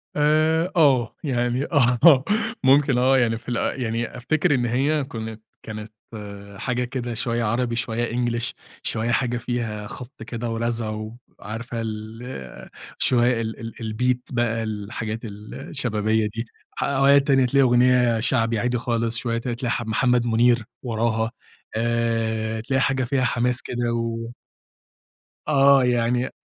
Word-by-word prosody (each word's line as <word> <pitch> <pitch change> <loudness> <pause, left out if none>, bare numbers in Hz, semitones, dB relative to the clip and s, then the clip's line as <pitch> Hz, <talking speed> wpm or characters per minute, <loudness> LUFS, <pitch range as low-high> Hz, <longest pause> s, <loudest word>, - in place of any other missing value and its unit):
آآ 155 +4 +3
آه، 135 -8 +3
يعني 125 -1 0
آه 130 0 +5 0.4
ممكن 135 -1 +5
آه، 130 +2 +4
يعني 115 -2 +2
في 120 - -10
ال 125 +2 -1
يعني 115 +1 -2
أفتكر 155 +4 +1
إن 120 -1 0
هي 140 +5 +1
كنت 110 -4 -6 0.2
كانت 110 0 -7 0.7
حاجة 125 +2 -1
كده 120 -1 -4
شوية 115 0 -1
عربي، 120 +2 0
شوية 115 0 -2
English، 120 -1 -1 0.3
شوية 115 +1 -1
حاجة 120 0 +1
فيها 115 -3 -3
خبط 125 0 -9
كده 115 +1 -4
ورزع، 115 -1 -1 0.5
وعارفة 115 +3 -5
ال 110 - -7 0.3
شوية 120 -1 +2
ال 110 0 -4
ال 115 0 -6 0.2
الbeat 125 +2 +1 0.2
بقى 115 -1 0
الحاجات 110 +1 -4
ال 105 0 -9 0.2
الشبابية 110 -4 0
دي، 115 +1 -3 0.4
أوقات 140 +1 +4
تاني 135 -2 +4
تلاقي 135 +2 +3
أغنية 125 -1 +4
شعبي 115 -1 +1
عادي 125 +1 0
خالص، 115 -1 -1
شوية 115 -1 -1
ت 115 - -5
تلاقي 120 0 -2
ح 120 - -1
محمد 120 +2 +2
منير 120 0 +3 0.2
وراها، 115 -1 0 0.4
آآ، 115 -1 0
تلاقي 135 +2 0
حاجة 135 -1 +1
فيها 130 +1 0
حماس 125 +1 +1
كده 120 -1 -2
و 115 0 -3 1.1
آه 140 -2 +5
يعني 125 +1 +1
120 Hz, 140 wpm, -23 LUFS, 115-125 Hz, 1.1 s, آه